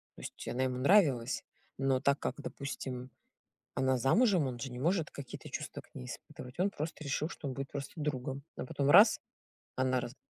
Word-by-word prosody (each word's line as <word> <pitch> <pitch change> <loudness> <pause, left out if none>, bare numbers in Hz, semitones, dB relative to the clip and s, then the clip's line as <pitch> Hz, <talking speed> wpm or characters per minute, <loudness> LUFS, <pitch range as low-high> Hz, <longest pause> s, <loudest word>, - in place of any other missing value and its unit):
То - - -11
есть - - -8
она 130 +2 0
ему 125 -1 0
нравилась, 135 - +4 0.3
но 135 -1 +2
так 140 +1 +3
как, 130 - -2
допустим, 130 -2 -5 0.6
она 130 0 +2
замужем, 175 - +4
он 120 -2 -4
же 135 -1 -4
не 125 - -6
может 165 +1 +1
какие-то 140 -3 -8
чувства - - -5
к - - -27
ней 60 - -6
испытывать. 125 +6 -9
Он 195 - +3
просто 155 -3 -5
решил, 150 +3 -1
что 145 - -6
он 130 - -2
будет 135 0 -5
просто 140 -1 -5
другом, 140 -2 -2
а - - -3
потом- 140 +2 0
раз, 205 +7 +8 0.6
она 130 -1 +2
раз 120 - -6
135 Hz, 190 wpm, -33 LUFS, 130-150 Hz, 0.6 s, раз